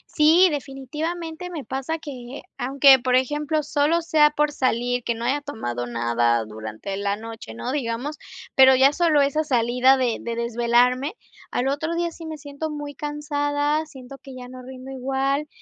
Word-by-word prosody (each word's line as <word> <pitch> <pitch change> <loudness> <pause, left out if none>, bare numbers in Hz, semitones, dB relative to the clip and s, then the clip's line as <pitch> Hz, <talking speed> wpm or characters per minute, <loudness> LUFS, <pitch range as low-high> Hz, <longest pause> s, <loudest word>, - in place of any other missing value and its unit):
Sí, 325 +4 +6
definitivamente 320 +5 -5
me 315 -5 -5
pasa 270 +6 -3
que, 260 -3 -8 0.2
aunque, 270 +1 +6
por 250 0 +1
ejemplo, 295 +4 +1
solo 300 +3 +1
sea 310 -3 +4
por 300 0 +1
salir, 245 -2 0
que 235 - 0
no 230 0 -7
haya 270 +4 0
tomado 120 - -4
nada 120 0 +1
durante 110 - -6
la 200 0 -1
noche, 225 - -9
¿no? 115 - -4
Digamos, 265 +2 -3 0.4
pero 265 0 +8
ya 265 +2 +5
solo 315 -2 +3
esa 285 +3 +1
salida 250 -1 +3
de 245 -3 0
de 235 -1 -4
desvelarme 240 - +1 0.4
al 250 - 0
otro 315 +5 -1
día 340 0 0
sí 330 0 -11
me 315 -1 -6
siento 290 +2 -5
muy 290 -1 -6
cansada, 295 +1 -1
siento 270 -3 -12
que 270 0 -12
ya 250 -1 -9
no 255 0 -10
rindo 260 +1 -10
igual 270 +2 -1
270 Hz, 170 wpm, -23 LUFS, 245-300 Hz, 0.4 s, pero